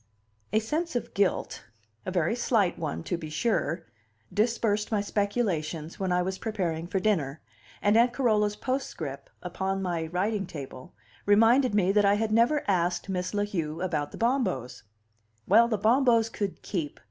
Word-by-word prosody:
A - - +2
sense 300 +9 -1
of 245 - -3
guilt 200 -2 0 0.4
a - - -1
very 180 +4 +1
slight 220 -6 +1
one, 80 0 -3
to 175 - -2
be 155 -2 -7
sure 165 -2 -1 0.5
dispersed 215 -1 +1
my 215 - +2
speculations 200 -7 -2
when 190 -2 -1
I 180 0 +2
was 190 +1 -3
preparing 175 -7 -2
for 190 +2 -1
dinner, 160 -8 0 0.4
and 205 +1 +4
Aunt 235 +2 +5
Carola's 215 -5 +1
postscript, 210 - -4
open - - -3
upon 195 0 -1
my 170 -3 -2
writing 195 +3 -1
table, 140 -3 -9 0.3
reminded 225 +4 +5
me 195 -2 +3
that 205 +1 +3
I 200 0 +4
had 220 +1 -1
never 235 +7 +3
asked 180 0 0
Miss 185 +1 -2
La 205 - +1
Heu 165 -6 -3
about 155 -6 -2
the - - -9
Bombos. 225 - -1 0.7
Well, 230 +4 +6
the 220 -2 0
Bombos 230 +1 +3
could 200 -3 -4
keep! 165 -7 -4
200 Hz, 165 wpm, -28 LUFS, 170-225 Hz, 0.7 s, Well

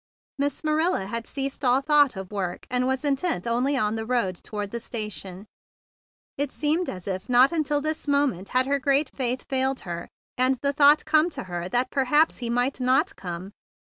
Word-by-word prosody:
Miss 285 +1 -1
Marilla 310 - +1
had 230 +3 -4
given 275 0 -2
over 265 - +1
all - - +3
thought 290 -3 +4
of 190 0 -7
work, 185 -4 -4
and 250 0 +1
was 265 +2 -1
intent 280 - 0
only 250 +4 +1
on 215 -3 +1
the 220 0 -3
road 235 -7 0
toward 205 +2 -6
the 235 - -4
station. 200 -5 -6 0.9
It - - +1
would 280 - -14
seem 315 +4 0
as 185 0 -7
if 190 +3 -4
not 250 +3 +6
until 295 -3 0
this 310 +1 -3
moment 280 -10 +1
had 255 +1 +2
her 280 +1 +1
great 275 +1 +2
faith 255 -1 -1
failed 265 0 0
her, 170 -1 -6 0.3
and 255 +1 +4
the 280 0 +1
thought 290 +1 +5
come 310 +2 +3
to - - -5
her 175 -1 -5
that 250 +3 0
perhaps 295 +4 +2
he 240 -2 -4
might 245 +3 0
not 255 +1 +2
come. 180 +1 -7
255 Hz, 200 wpm, -25 LUFS, 210-285 Hz, 0.9 s, not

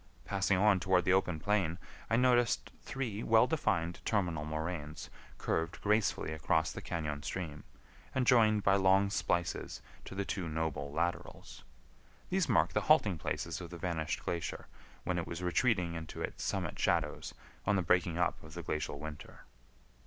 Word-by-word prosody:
Passing 100 -1 +1
on 100 0 +4
toward 90 -1 +2
the 95 - +4
open 90 -4 +1
plain, 95 -3 +1 0.3
I 110 - +3
noticed 120 -1 +3
three 125 -7 -4
well 115 +1 +5
defined 90 - 0
terminal 85 -8 0
moraines 80 0 -4 0.3
curved 80 +1 -1
gracefully 105 -6 +1
across 80 +1 +1
the - - -7
cañon 75 -3 -3
stream, 80 -6 -4 0.5
and 130 -1 +2
joined 110 -4 +5
by 100 0 +4
long 95 +1 +4
splices 85 -3 -1 0.3
to - - -8
the 100 0 -1
two 95 -4 -3
noble 75 -3 -2
laterals. 85 +3 -3 0.7
These - - +1
mark - - +3
the - - +2
halting 95 -6 +5
places - - -3
of - - -7
the - - -8
vanished 80 -3 -2
glacier 85 -1 -3 0.4
when 90 -1 -1
it 85 - -4
was 85 +2 -5
retreating 90 -1 +2
into 80 -1 -7
its - - -4
summit - - -2
shadows - - 0 0.3
on 105 - +4
the 95 - +1
breaking 85 -1 +2
up 85 -1 0
of 80 +1 -12
the 85 - -5
glacial 75 -2 -2
winter. 75 0 -9
90 Hz, 160 wpm, -33 LUFS, 80-100 Hz, 0.7 s, well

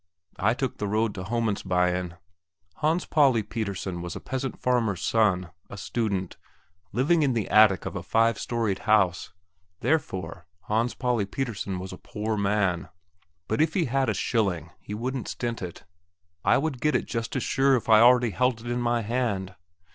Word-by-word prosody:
I 110 +4 +2
took 130 -1 -3
the 105 - -1
road 110 +1 0
to 90 - -6
Homandsbyen. 90 -5 0 0.6
Hans 160 +4 +1
Pauli 135 -8 +3
Pettersen 100 -5 -4
was 85 -1 -5
a - - -5
peasant 130 0 -4
farmer's 115 -7 0
son, 95 -6 +2 0.2
a 105 - -8
student, 100 -3 -2 0.5
living 150 - +2
in 140 -4 +2
the 110 -4 -1
attic 105 -3 +5
of - - -5
a 90 - -3
five 115 +4 +2
storeyed 115 -5 -1
house; 95 -5 +3 0.5
therefore, 95 - -2
Hans 115 +5 0
Pauli 120 -6 0
Pettersen 100 -5 -3
was 95 +1 -6
a 90 - -10
poor 110 +1 -3
man. 100 -4 0 0.6
But 110 - 0
if 160 0 +1
he 180 -4 +2
had 130 0 +1
a 105 - 0
shilling 90 - -1
he 105 - -7
wouldn't 125 +3 -3
stint 120 -2 -3
it. 90 -2 -7 0.6
I - - +4
would 140 -3 -2
get 150 -3 +2
it - - +1
just 115 +2 -4
as 130 - 0
sure 135 0 +3
as 115 - -4
if - - -20
I 110 -1 +8
already 120 0 +6
held 125 +1 +1
it 120 +1 -5
in 120 0 -1
my 120 -1 +1
hand. 105 -5 -1
110 Hz, 175 wpm, -26 LUFS, 95-125 Hz, 0.6 s, I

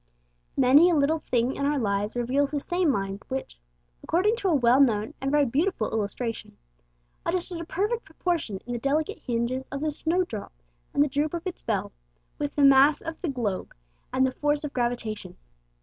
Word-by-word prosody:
Many 275 +7 +6
a 345 - +3
little 305 +2 +2
thing 245 -2 0
in - - -3
our 295 0 +1
lives 205 -2 -1
reveals 260 +4 +1
the 290 0 -1
same 350 +3 0
Mind 195 -5 -1
which, 265 - -5 0.4
according 395 +7 +2
to 410 - -1
a 330 - +3
well 250 0 +5
known 220 -5 +2
and 270 - -1
very 295 0 +3
beautiful 280 - 0
illustration, 225 +2 -3 0.7
adjusted 345 0 -2
a - - -6
perfect 425 +8 -1
proportion 330 - -2
in 245 - -4
the 240 - -2
delicate 290 +5 0
hinges 245 +2 -2
of 275 0 -5
the 310 0 0
snowdrop 320 - -2 0.4
and 285 - +4
the - - +1
droop 290 +4 -1
of 340 - -5
its 370 - -5
bell, 210 -4 -2 0.5
with 290 -1 -3
the 285 - +5
mass 275 +2 +6
of 325 0 -7
the 350 - -1
globe 225 -8 -3 0.4
and 260 0 +3
the 260 - 0
force 295 +2 0
of 295 - -5
gravitation. 240 -3 -3
275 Hz, 185 wpm, -26 LUFS, 240-315 Hz, 0.7 s, Many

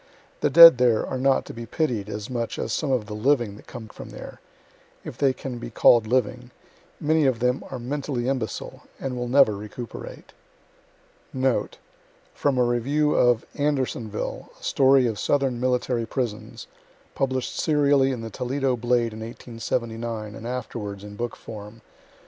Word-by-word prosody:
The - - +2
dead 165 -6 +10
there 120 -3 +3
are 130 - -4
not 135 0 +2
to - - -9
be 115 0 -8
pitied 120 - -1
as 105 -1 -5
much 120 -2 -3
as 110 - -3
some 150 -3 -1
of 125 -5 +1
the 105 - -7
living 120 -2 +1
that - - -16
come 120 -3 -9
from - - -11
there - - -10 0.6
if - - -7
they 140 -2 +2
can 130 -2 -6
be - - -6
call' 120 +1 +5
d 110 - -10
living 125 0 0 0.5
many 155 -1 +2
of 130 -3 +1
them 125 +2 0
are 130 - -5
mentally 130 0 -3
imbecile, 125 -7 -3 0.2
and 135 -2 -4
will 125 0 -3
never 125 -4 +5
recuperate. 105 +3 -9 1.0
Note: 130 -1 0 0.6
From 140 -3 0
a 125 - +4
review 140 +6 +1
of 120 -2 +3
"ANDERSONVILLE, 130 -7 -2
A - - -19
STORY 135 -1 +4
OF 110 -4 -2
SOUTHERN 135 -4 +1
MILTTARY 125 -2 0
PRISONS," 120 -4 -4 0.5
published 130 -2 -2
serially 145 -3 +3
in 125 -3 -4
the 115 0 -7
Toledo 130 +3 -1
"Blade" 120 -1 0
in 110 - -8
1879, 115 -1 -4
and 115 - -8
afterwards 110 -5 -5
in 105 0 -9
book 120 +2 -4
form. 105 +1 -10
125 Hz, 165 wpm, -24 LUFS, 115-135 Hz, 1.0 s, dead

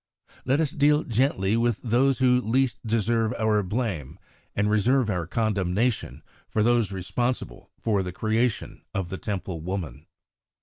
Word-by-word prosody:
Let 135 +3 +2
us 155 -3 +1
deal 150 -2 +3
gently 115 -4 +1
with 115 -1 +1
those 125 +3 +3
who 125 -1 +4
least 125 +2 +1
deserve 115 0 +1
our 110 -2 +2
blame, 95 - -3 0.4
and 105 0 +1
reserve 110 +3 +2
our 90 -4 -2
condemnation 105 +2 -1 0.3
for 110 - +1
those 120 -3 +2
responsible 120 +7 -3
for 105 -4 +1
the 90 -1 -4
creation 110 +5 -1
of 95 -3 -2
the 95 - -5
Temple 95 -5 -4
woman. 90 -2 -5
110 Hz, 140 wpm, -26 LUFS, 95-125 Hz, 0.4 s, who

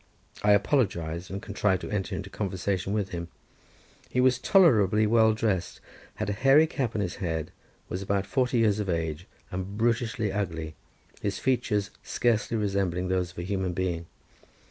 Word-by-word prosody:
I 105 0 +5
apologized, 90 - 0
and 100 +1 -5
contrived 100 -3 0
to - - -6
enter 105 -2 -2
into 100 0 -6
conversation 95 -1 -2
with 105 -2 -1
him. 85 -2 -5 0.8
He 125 - -1
was 125 0 +4
tolerably 110 - +5
well 110 0 +4
dressed, 95 -6 -1 0.4
had - - -3
a 105 - 0
hairy 135 +8 +5
cap 130 -7 -2
on 105 - 0
his 90 - -4
head, 80 -4 -3 0.4
was 90 - -4
about 100 0 0
forty 125 +3 +1
years 110 -3 +3
of 100 -2 -2
age, 80 0 -2 0.2
and 95 +2 -4
brutishly 115 -2 0
ugly, 80 -6 -3 0.5
his 100 -2 -2
features 105 -6 0
scarcely 115 -1 0
resembling 95 -3 0
those 90 -1 0
of - - -23
a 85 - -3
human 95 -1 -2
being. 85 -2 -2
100 Hz, 165 wpm, -27 LUFS, 90-110 Hz, 0.8 s, I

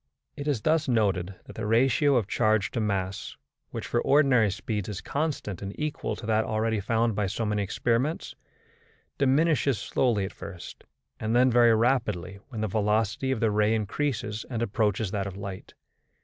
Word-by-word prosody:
It 145 - -6
is 140 -7 0
thus 155 +2 +2
noted 100 -6 +1
that - - -11
the 110 -1 -3
ratio 135 +5 +3
of 115 -6 +1
charge 110 -2 +1
to 115 - -2
mass 95 -3 -2 0.3
which - - -5
for 120 - 0
ordinary 135 -7 +4
speeds 105 +1 -3
is 105 - -4
constant 140 - -3
and 100 0 -7
equal 150 0 -2
to - - -9
that 110 0 +2
already 110 0 0
found 115 +3 +1
by 105 -1 0
so 105 +4 -2
many 105 -1 0
experiments 120 - -1 0.9
diminishes 140 -2 +3
slowly 110 -2 0
at 95 - -7
first, 90 -2 -10 0.3
and 110 +2 -1
then 125 +1 +5
very 120 -1 +6
rapidly 110 -6 0
when 115 -5 -5
the 110 - 0
velocity 105 +4 0
of 130 -4 -1
the 110 -2 +3
ray 105 +1 +2
increases 110 0 -2
and 115 -2 -2
approaches 105 -2 0
that 100 -2 -2
of 95 -1 -7
light. 100 -2 -8
110 Hz, 175 wpm, -27 LUFS, 105-125 Hz, 0.9 s, very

